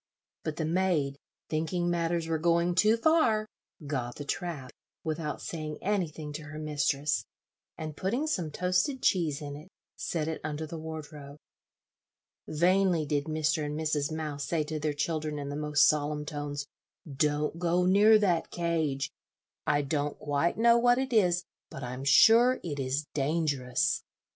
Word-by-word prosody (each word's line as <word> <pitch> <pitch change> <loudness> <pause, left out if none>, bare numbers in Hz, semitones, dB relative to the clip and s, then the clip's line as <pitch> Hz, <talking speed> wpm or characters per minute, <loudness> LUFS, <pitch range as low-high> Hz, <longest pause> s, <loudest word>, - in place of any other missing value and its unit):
But 155 - -3
the 160 - -2
maid, 160 -5 0 0.3
thinking 165 +3 -1
matters 170 -1 0
were 160 -1 0
going 170 +1 +2
too 215 +5 +4
far, 230 -6 +3 0.4
got 130 -4 -3
the 145 - -7
trap, 150 -6 -4 0.3
without 155 -1 -3
saying 155 -2 -5
anything 165 -7 -2
to 155 +1 -6
her 150 +1 -8
mistress, 150 -1 0 0.5
and 155 -2 -6
putting 235 - -1
some 180 - -1
toasted 180 - 0
cheese 160 -5 +1
in 145 -1 -6
it, 155 +5 -11 0.3
set 160 -3 -2
it 160 - -3
under 155 0 -3
the 160 +1 -7
wardrobe. 150 -2 -8 1.1
Vainly 175 0 +2
did 145 -1 0
Mr. 155 0 0
and 150 +1 -3
Mrs. 150 -1 0
Mouse 150 -2 -3
say 165 -2 0
to 155 +1 -4
their 150 0 -1
children, 155 0 -2
in 140 -1 -4
the 145 - -4
most 150 -1 +4
solemn 150 0 0
tones, 145 -1 -4 0.4
"Don't 150 +2 0
go 175 +1 +2
near 205 +4 +6
that 180 -6 +1
cage; 155 -5 -1 0.6
I 145 0 +2
don't 145 +1 -2
quite 145 +3 0
know 235 +1 +5
what 245 +1 +4
it 265 -1 -2
is, 180 -5 +3 0.3
but 135 - -8
I'm 125 +2 -5
sure 235 - +6
it 145 -5 -4
is 135 +3 -1
dangerous." 150 +1 0
155 Hz, 155 wpm, -29 LUFS, 145-175 Hz, 1.1 s, near